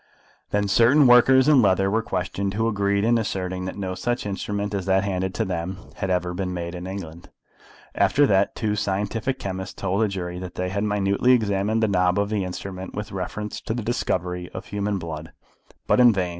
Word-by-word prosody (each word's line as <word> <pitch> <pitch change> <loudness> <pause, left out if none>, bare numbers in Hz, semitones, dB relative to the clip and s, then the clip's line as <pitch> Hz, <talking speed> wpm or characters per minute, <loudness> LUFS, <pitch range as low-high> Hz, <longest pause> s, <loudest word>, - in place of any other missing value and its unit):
Then 105 0 0
certain 120 +9 +5
workers 130 +2 +6
in 145 -4 +6
leather 95 -1 +3
were 110 +2 +2
questioned, 95 -1 -3
who 110 +1 +1
agreed 100 -2 +1
in 115 +1 +3
asserting 95 -3 -3
that 95 - -5
no 95 -2 -3
such 120 +7 -2
instrument 100 +1 -3
as 95 -2 -3
that 95 0 +3
handed 95 -1 -2
to 110 - 0
them 90 0 -3 0.2
had 95 - -2
ever 90 -1 0
been 90 0 -3
made 85 0 -4
in 90 0 -6
England. 85 -4 -8 0.6
After 145 - +3
that, 100 -5 +2
two 105 -2 -1
scientific 105 +5 -1
chemists 95 0 -5
told 95 +2 -1
the 110 - +3
jury 90 -3 -4
that 90 -1 -8
they 90 0 -2
had 100 +2 -2
minutely 105 +4 +2
examined 110 -1 +1
the - - +4
knob 90 -1 +2
of 100 0 +1
the 105 -3 0
instrument 95 +1 -6
with 105 +1 -5
reference 105 +2 -5
to 110 - -3
the 120 - -3
discovery 90 -6 -2
of - - -6
human 105 0 -2
blood, 80 -2 -7 0.5
but - - +3
in 120 -1 +8
vain. 95 -4 -1
100 Hz, 200 wpm, -24 LUFS, 90-105 Hz, 0.6 s, in